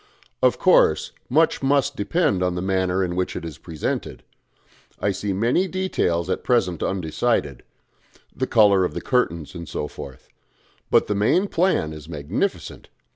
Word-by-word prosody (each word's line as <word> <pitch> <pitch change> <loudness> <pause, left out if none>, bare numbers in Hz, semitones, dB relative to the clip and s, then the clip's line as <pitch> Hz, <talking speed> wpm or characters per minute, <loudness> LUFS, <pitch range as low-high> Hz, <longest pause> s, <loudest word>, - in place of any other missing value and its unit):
Of - - +3
course - - +3 0.2
much 160 +5 +2
must 140 0 +1
depend 100 - 0
on 90 -1 0
the 90 - -2
manner 95 0 0
in 85 -1 -2
which 90 0 -2
it - - -5
is 75 -4 -8
presented. 80 -3 -4 0.8
I 100 - +1
see 100 +1 -3
many 115 - +1
details 175 - -1
at 95 - -2
present 90 - +1
undecided 85 - -1 0.7
the 130 - -2
colour 100 -5 +5
of 90 - -2
the - - -3
curtains, 85 - -1
and 85 -3 -8
so 75 - -3
forth. 65 -2 -10 0.6
But - - +4
the - - -1
main 110 - +2
plan 170 - +1
is 75 0 -11
magnificent. 85 - -3
95 Hz, 155 wpm, -23 LUFS, 85-125 Hz, 0.8 s, colour